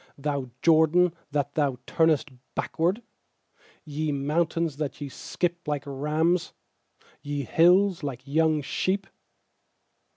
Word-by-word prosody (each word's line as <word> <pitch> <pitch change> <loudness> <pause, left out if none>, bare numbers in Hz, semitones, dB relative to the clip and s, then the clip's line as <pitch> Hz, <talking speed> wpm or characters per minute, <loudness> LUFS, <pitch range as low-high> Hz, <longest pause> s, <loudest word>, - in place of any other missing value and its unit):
Thou 140 -2 -2
Jordan, 165 +2 +5 0.2
that 145 -1 -1
thou 140 -4 +1
turnest 160 -3 +2 0.2
backward? 180 +8 0 0.8
6Ye 150 +1 -2
mountains, 155 +2 0
that 150 -2 -4
ye 145 -2 -5
skip 175 +4 -3
like 145 -2 -1
rams, 155 +5 0 0.7
Ye 145 -1 -3
hills, 180 - +4
like 135 -4 -5
young 155 +1 +2
sheep? 190 +7 -1
155 Hz, 105 wpm, -26 LUFS, 145-170 Hz, 0.8 s, Jordan